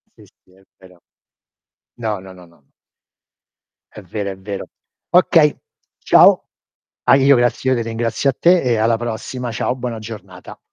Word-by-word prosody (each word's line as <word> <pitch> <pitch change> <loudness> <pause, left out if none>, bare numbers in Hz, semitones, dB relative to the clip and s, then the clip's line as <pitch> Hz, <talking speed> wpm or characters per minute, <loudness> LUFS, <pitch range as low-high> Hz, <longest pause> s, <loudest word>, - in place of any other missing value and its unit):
Sì, - - -18 0.2
sì, 90 - -27
è 95 +1 -24
vero. 90 -2 -19 0.9
No, 110 -4 -3
no, 95 0 -12
no, 90 -1 -15
no. 85 -4 -26 1.3
È 105 - -11
vero, 100 +2 -5
è 95 - -7
vero. 100 +1 -7 0.4
Okay, 165 -4 +4 0.4
ciao. - - +5 0.6
Ah - - +6
io 140 +1 +5
grazie 120 +1 0
io - - +3
te - - -1
ringrazio 115 +3 -1
a - - 0
te 175 0 +4
e 120 -3 0
alla 115 +1 +1
prossima. 120 +2 -5
Ciao, 120 +2 -2
buona 125 -2 -5
giornata. 105 -5 -11
115 Hz, 155 wpm, -18 LUFS, 95-125 Hz, 1.3 s, Ah